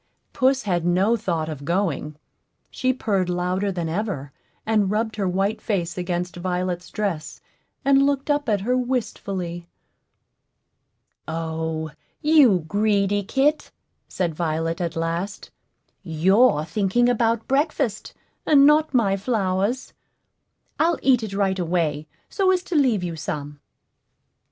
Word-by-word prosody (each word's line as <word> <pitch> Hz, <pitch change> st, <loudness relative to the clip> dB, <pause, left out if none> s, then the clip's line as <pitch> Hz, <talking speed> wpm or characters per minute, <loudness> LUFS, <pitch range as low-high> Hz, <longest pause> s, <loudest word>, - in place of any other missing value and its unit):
Puss 265 Hz, +1 st, +2 dB
had 175 Hz, -4 st, 0 dB
no 185 Hz, +6 st, +2 dB
thought 170 Hz, -8 st, -2 dB
of 150 Hz, -3 st, -6 dB
going; 165 Hz, -3 st, -1 dB, 0.6 s
she 255 Hz, -1 st, 0 dB
purred 200 Hz, -7 st, -1 dB
louder 180 Hz, +3 st, -1 dB
than 175 Hz, -3 st, -3 dB
ever, 165 Hz, -6 st, -3 dB, 0.3 s
and 215 Hz, -3 st, +2 dB
rubbed 220 Hz, +2 st, -1 dB
her 195 Hz, -3 st, 0 dB
white 195 Hz, +4 st, -1 dB
face 175 Hz, -6 st, -2 dB
against 180 Hz, 0 st, -3 dB
Violet's 180 Hz, 0 st, -3 dB
dress, 195 Hz, -8 st, -3 dB, 0.5 s
and 275 Hz, 0 st, +5 dB
looked 280 Hz, +1 st, +1 dB
up 290 Hz, -3 st, 0 dB
at 205 Hz, -2 st, +1 dB
her 250 Hz, +5 st, +1 dB
wistfully. 200 Hz, -9 st, -3 dB, 1.6 s
"O, 160 Hz, -1 st, -3 dB, 0.3 s
you 280 Hz, -, +4 dB
greedy 205 Hz, +1 st, +1 dB
kit!" 275 Hz, +9 st, +1 dB, 0.4 s
said 175 Hz, -3 st, -2 dB
Violet, 165 Hz, +1 st, -2 dB
at 170 Hz, -1 st, -2 dB
last; 170 Hz, +5 st, -3 dB, 0.5 s
"you're 185 Hz, +1 st, +3 dB
thinking 200 Hz, +7 st, +1 dB
about 230 Hz, -2 st, +1 dB
breakfast, 275 Hz, -6 st, -1 dB, 0.3 s
and 280 Hz, -2 st, +6 dB
not 300 Hz, -1 st, +4 dB
my 200 Hz, -5 st, +3 dB
flowers. 200 Hz, +2 st, -1 dB, 0.9 s
I'll 335 Hz, 0 st, +3 dB
eat 255 Hz, -3 st, +4 dB
it 215 Hz, -3 st, -5 dB
right 195 Hz, -1 st, 0 dB
away, 160 Hz, -4 st, -1 dB, 0.2 s
so 385 Hz, -2 st, +1 dB
as 370 Hz, -1 st, +2 dB
to 360 Hz, -, -5 dB
leave 250 Hz, -10 st, +3 dB
you 170 Hz, -2 st, -3 dB
some." 145 Hz, -1 st, -5 dB
195 Hz, 125 wpm, -23 LUFS, 170-240 Hz, 1.6 s, and